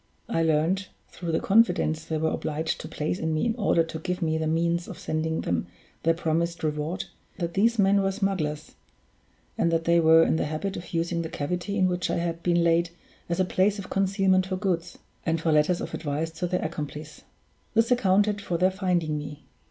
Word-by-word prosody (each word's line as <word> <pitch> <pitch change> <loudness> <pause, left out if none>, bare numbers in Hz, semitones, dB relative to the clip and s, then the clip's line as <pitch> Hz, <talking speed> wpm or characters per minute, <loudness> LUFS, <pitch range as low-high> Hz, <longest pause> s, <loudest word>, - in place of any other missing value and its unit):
I 165 - 0
learned, 165 +5 +1 0.2
through 170 -2 -5
the 160 - +1
confidence 180 -7 +2
they 160 -1 -2
were 160 +1 0
obliged 155 +1 -2
to - - -7
place 155 +4 -3
in 160 -1 -1
me 155 - 0
in 230 -1 0
order 200 -7 +2
to 165 0 -6
give 180 +3 -3
me 160 -1 +1
the 160 - -1
means 170 +2 0
of 185 - -8
sending 160 -3 -2
them 85 -1 -1 0.3
their 165 0 +2
promised 170 0 -1
reward, 150 +3 -2 0.3
that 170 -2 -3
these 230 +4 +3
men 200 -1 +4
were 195 0 +1
smugglers, 185 -7 -2 0.9
and 170 - +3
that 165 0 +1
they 170 +1 +4
were 160 0 +6
in 160 - +2
the - - 0
habit 155 +6 -3
of 175 - -8
using 170 +1 0
the 160 - -4
cavity 180 +8 -3
in 185 -2 +4
which 180 -1 -1
I - - 0
had 170 -1 -2
been 175 -1 +2
laid 170 0 +3 0.4
as 170 +1 -1
a 185 - +3
place 195 +3 +2
of 200 - -8
concealment 190 -1 +2
for 185 -1 -2
goods, 180 -3 -2 0.3
and 165 0 0
for 160 0 +1
letters 155 +4 +3
of - - -6
advice 155 +2 -2
to 165 +2 -3
their 180 +1 -1
accomplices. 150 -1 -6 0.5
This 225 +2 +3
accounted 205 -3 +3
for 175 -4 -2
their 185 +2 +3
finding 175 -6 0
me. 145 0 -8
170 Hz, 205 wpm, -26 LUFS, 160-190 Hz, 0.9 s, were